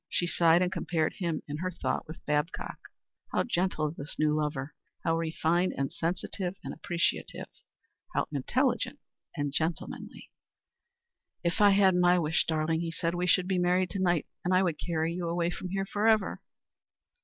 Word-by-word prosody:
She 175 Hz, -, 0 dB
sighed 170 Hz, 0 st, +4 dB
and 180 Hz, -, 0 dB
compared 160 Hz, -4 st, 0 dB
him 170 Hz, -5 st, -2 dB
in 145 Hz, 0 st, -4 dB
her 185 Hz, +3 st, -2 dB
thought 180 Hz, -, -2 dB
with 160 Hz, -, -10 dB
Babcock. 150 Hz, +3 st, -1 dB, 0.5 s
How -, -, +2 dB
gentle 175 Hz, -8 st, 0 dB
this 150 Hz, -2 st, -7 dB
new 155 Hz, 0 st, +3 dB
lover! 150 Hz, -2 st, -2 dB, 0.3 s
How 165 Hz, -, +2 dB
refined 165 Hz, +2 st, +1 dB
and 135 Hz, -1 st, -1 dB
sensitive 180 Hz, +2 st, -2 dB
and -, -, -5 dB
appreciative! 170 Hz, -1 st, -1 dB, 0.7 s
How -, -, +1 dB
intelligent -, -, 0 dB, 0.4 s
and 145 Hz, -1 st, -1 dB
gentlemanly! 160 Hz, +2 st, -3 dB, 1.1 s
"If 170 Hz, +3 st, 0 dB
I 205 Hz, -, +8 dB
had 195 Hz, -1 st, +5 dB
my 180 Hz, 0 st, +5 dB
wish, 160 Hz, -2 st, +1 dB
darling," 160 Hz, 0 st, +1 dB
he 170 Hz, -, -2 dB
said, 165 Hz, 0 st, -1 dB
"we 180 Hz, +1 st, -1 dB
should 180 Hz, 0 st, +4 dB
be 185 Hz, -1 st, +1 dB
married 180 Hz, +1 st, +2 dB
to 195 Hz, -, -3 dB
night 175 Hz, -4 st, +2 dB, 0.2 s
and 185 Hz, +1 st, +2 dB
I 185 Hz, -, +5 dB
would 170 Hz, -5 st, -1 dB
carry 165 Hz, -1 st, -1 dB
you 175 Hz, -1 st, -3 dB
away 170 Hz, 0 st, 0 dB
from 185 Hz, -, -6 dB
here 195 Hz, +1 st, -1 dB
forever." 215 Hz, +1 st, +2 dB
170 Hz, 165 wpm, -29 LUFS, 160-180 Hz, 1.1 s, I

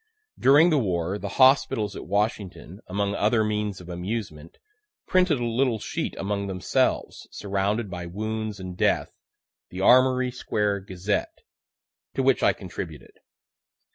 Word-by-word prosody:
During 150 Hz, +6 st, +6 dB
the 150 Hz, -, +3 dB
war, 95 Hz, -3 st, -1 dB
the 100 Hz, -, -5 dB
hospitals 130 Hz, -6 st, +4 dB
at -, -, -8 dB
Washington, 100 Hz, -3 st, -2 dB
among 100 Hz, +2 st, -1 dB
other 110 Hz, +2 st, +2 dB
means 105 Hz, -2 st, -2 dB
of 90 Hz, -, -12 dB
amusement, 90 Hz, -3 st, -5 dB, 0.5 s
printed 180 Hz, -7 st, +2 dB
a 120 Hz, -, -1 dB
little 120 Hz, 0 st, +1 dB
sheet -, -, -4 dB
among 100 Hz, 0 st, -2 dB
themselves, 95 Hz, -2 st, -1 dB
surrounded 100 Hz, +3 st, -2 dB
by 90 Hz, -2 st, -6 dB
wounds 110 Hz, +2 st, -4 dB
and 90 Hz, -1 st, -7 dB
death, -, -, +1 dB, 0.6 s
the 90 Hz, -, -6 dB
"Armory 130 Hz, +2 st, +4 dB
Square 105 Hz, -4 st, -1 dB
Gazette," 95 Hz, -, -2 dB, 0.7 s
to -, -, 0 dB
which -, -, +3 dB
I -, -, +5 dB
contributed. 440 Hz, +1 st, -8 dB
105 Hz, 135 wpm, -25 LUFS, 95-120 Hz, 0.7 s, During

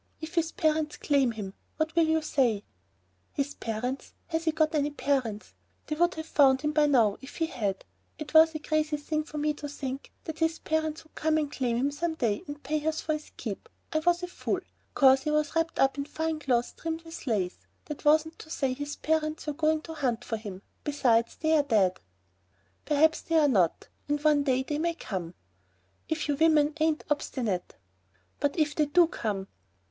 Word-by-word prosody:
"If 320 Hz, +2 st, -7 dB
his 335 Hz, -1 st, +1 dB
parents 310 Hz, -2 st, 0 dB
claim 275 Hz, -5 st, +2 dB
him, 200 Hz, -3 st, -6 dB, 0.2 s
what 315 Hz, +1 st, -1 dB
will 335 Hz, -1 st, +4 dB
you 320 Hz, 0 st, +2 dB
say?" 245 Hz, -9 st, +1 dB, 0.7 s
"His 285 Hz, 0 st, -1 dB
parents! 245 Hz, +4 st, -4 dB, 0.2 s
Has 325 Hz, 0 st, -1 dB
he 320 Hz, -, +3 dB
got 315 Hz, 0 st, +1 dB
any 295 Hz, -1 st, +1 dB
parents? 265 Hz, -7 st, -1 dB, 0.3 s
They 305 Hz, -, -3 dB
would 345 Hz, +3 st, +2 dB
have 315 Hz, 0 st, -5 dB
found 270 Hz, -4 st, +4 dB
him 300 Hz, -, +1 dB
by 300 Hz, -1 st, +4 dB
now 230 Hz, -8 st, +3 dB
if 270 Hz, -, -11 dB
he 330 Hz, -, +1 dB
had. 205 Hz, -, -3 dB, 0.3 s
It 305 Hz, 0 st, -7 dB
was 320 Hz, 0 st, +7 dB
a -, -, -2 dB
crazy 305 Hz, 0 st, 0 dB
thing 305 Hz, +1 st, -2 dB
for 305 Hz, -, -8 dB
me 300 Hz, 0 st, +1 dB
to 295 Hz, 0 st, -7 dB
think 270 Hz, -1 st, -5 dB
that 315 Hz, -1 st, -6 dB
his 325 Hz, 0 st, +1 dB
parents 315 Hz, 0 st, -1 dB
would 315 Hz, -, -25 dB
come 315 Hz, 0 st, +1 dB
and 295 Hz, -2 st, -1 dB
claim 245 Hz, -5 st, 0 dB
him 275 Hz, +4 st, +1 dB
some 320 Hz, +3 st, -2 dB
day 225 Hz, -8 st, 0 dB
and 290 Hz, 0 st, -8 dB
pay 300 Hz, +2 st, -1 dB
us 315 Hz, 0 st, 0 dB
for 310 Hz, -, -1 dB
his 305 Hz, 0 st, -5 dB
keep. -, -, -6 dB, 0.2 s
I 310 Hz, -, +3 dB
was 350 Hz, +2 st, +2 dB
a -, -, -1 dB
fool. 355 Hz, -, -2 dB, 0.3 s
'Cause 265 Hz, -1 st, +6 dB
he 300 Hz, -, -2 dB
was 300 Hz, +1 st, 0 dB
wrapped 330 Hz, 0 st, 0 dB
up 270 Hz, +1 st, +3 dB
in 280 Hz, -, -1 dB
fine 320 Hz, +1 st, -2 dB
clothes 245 Hz, -5 st, +1 dB
trimmed 325 Hz, 0 st, -4 dB
with 325 Hz, -3 st, -9 dB
lace, 195 Hz, -6 st, 0 dB, 0.3 s
that 300 Hz, -, -7 dB
wasn't 315 Hz, +2 st, +3 dB
to 315 Hz, -, -11 dB
say 275 Hz, -4 st, 0 dB
that 255 Hz, +2 st, -4 dB
his 290 Hz, 0 st, -4 dB
parents 310 Hz, 0 st, -1 dB
were 300 Hz, -, -2 dB
going 310 Hz, +1 st, +1 dB
to 325 Hz, -, -7 dB
hunt 250 Hz, -6 st, -1 dB
for 225 Hz, -, -2 dB
him. 200 Hz, -3 st, -8 dB, 0.2 s
Besides, 240 Hz, -6 st, +2 dB
they're 315 Hz, -1 st, +3 dB
dead." 210 Hz, -9 st, +2 dB, 0.9 s
"Perhaps 315 Hz, +2 st, +3 dB
they're 320 Hz, -3 st, +3 dB
not. 190 Hz, -, +2 dB, 0.2 s
And 295 Hz, 0 st, +1 dB
one 300 Hz, -2 st, +5 dB
day 260 Hz, -1 st, +2 dB
they 295 Hz, +2 st, -2 dB
may 335 Hz, +1 st, 0 dB
come...." 180 Hz, -, -5 dB, 0.7 s
"If 315 Hz, -1 st, -1 dB
you 290 Hz, -, +1 dB
women 310 Hz, -1 st, +4 dB
ain't 315 Hz, 0 st, +1 dB
obstinate!" 240 Hz, -10 st, -1 dB, 0.6 s
"But 285 Hz, +5 st, 0 dB
if 300 Hz, -2 st, +2 dB
they 300 Hz, 0 st, +2 dB
do 345 Hz, +4 st, +6 dB
come?" 210 Hz, -, -3 dB
300 Hz, 205 wpm, -28 LUFS, 265-315 Hz, 0.9 s, was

